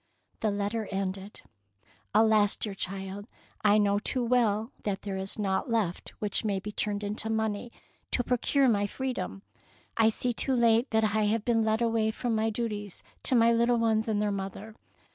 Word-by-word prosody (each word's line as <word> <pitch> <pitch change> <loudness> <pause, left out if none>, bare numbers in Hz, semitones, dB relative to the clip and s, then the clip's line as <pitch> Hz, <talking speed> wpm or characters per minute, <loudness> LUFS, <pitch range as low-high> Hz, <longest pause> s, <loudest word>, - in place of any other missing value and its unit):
The 220 - +1
letter 205 +2 -2
ended, 195 +1 -4 0.4
— - - -26
''Alas, 215 -1 +4
dear 210 - -3
child, 195 +2 -5 0.4
I 210 0 +5
know 205 -1 +3
too 250 +3 -1
well 230 -2 +2
that 200 -2 -3
there 200 -2 -4
is 190 0 -4
naught 195 +1 -1
left 215 -7 -1
which 210 0 -1
may 200 -3 0
be 210 +2 -6
turned 205 0 -2
into 210 +2 -3
money 220 +1 -1 0.4
to 245 - 0
procure 260 +3 +2
my 205 -4 +2
free 260 +5 -3
dom. 95 - -5 0.5
I 225 -1 +5
see 245 +2 -1
too 265 +3 0
late 235 +1 +3
that 220 0 +2
I 215 0 +2
have 215 +1 0
been 230 -2 +2
led 220 +1 +1
away 225 -1 +1
from 235 +1 -2
my 220 0 +1
duties 210 -3 -4 0.2
to 260 - +3
my 230 0 +5
little 235 +1 +3
ones 225 -1 +1
and 215 -2 0
their 210 0 +1
mother. 200 +2 -5
215 Hz, 185 wpm, -29 LUFS, 205-230 Hz, 0.5 s, I